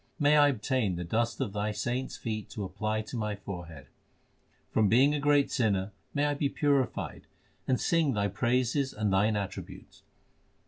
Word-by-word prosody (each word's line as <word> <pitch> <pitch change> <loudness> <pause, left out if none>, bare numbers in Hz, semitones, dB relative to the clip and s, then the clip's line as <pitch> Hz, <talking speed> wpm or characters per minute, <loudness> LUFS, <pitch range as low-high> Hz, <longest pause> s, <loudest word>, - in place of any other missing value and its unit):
May 150 -1 +4
I 145 -1 +7
obtain 125 -6 0
the 90 - -4
dust 115 +7 -1
of 110 -7 -2
Thy 105 +1 -1
saints 125 +4 -3
feet 110 -3 -4
to 105 - -5
apply 110 +3 -2
to 110 - -8
my 105 -3 -2
forehead! 90 -7 -8 0.9
From 110 -2 +3
being 130 +7 +5
a 150 - 0
great 145 -1 +3
sinner 100 -5 +1 0.2
may 145 +1 +2
I 145 - +1
be 140 0 0
purified 140 -4 -1 0.4
and 130 - +2
sing 160 -7 +2
Thy 100 0 +1
praises 125 +6 0
and 105 -2 -1
Thine 105 +3 +3
attributes 100 -2 -6
115 Hz, 170 wpm, -29 LUFS, 100-140 Hz, 0.9 s, I